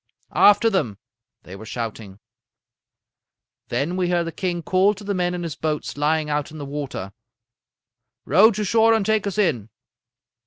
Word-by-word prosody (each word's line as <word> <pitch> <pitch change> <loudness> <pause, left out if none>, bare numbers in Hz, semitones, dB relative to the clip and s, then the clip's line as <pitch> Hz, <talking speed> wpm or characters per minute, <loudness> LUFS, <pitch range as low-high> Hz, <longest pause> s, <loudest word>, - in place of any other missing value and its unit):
"'After 205 +3 +5
them!' 120 - -1 0.5
they 90 - -10
were 100 - -10
shouting. 110 -3 -6 1.5
"Then 140 +9 -2
we 180 -1 0
heard 175 -1 +1
the 165 - -4
king 175 0 -3
call 190 +5 +2
to 200 - -12
the 200 0 -2
men 180 -1 -1
in 175 - -4
his 165 -3 -5
boats 155 -1 -3
lying 150 +1 0
out 150 -1 -2
in 155 - -11
the 145 - -6
water: 140 -9 -6 1.1
"'Row 195 - +6
to 215 -1 -2
shore 225 +3 +4
and 215 -3 0
take 220 -1 +1
us 200 - -4
in.' 140 - 0
170 Hz, 165 wpm, -22 LUFS, 140-195 Hz, 1.5 s, Row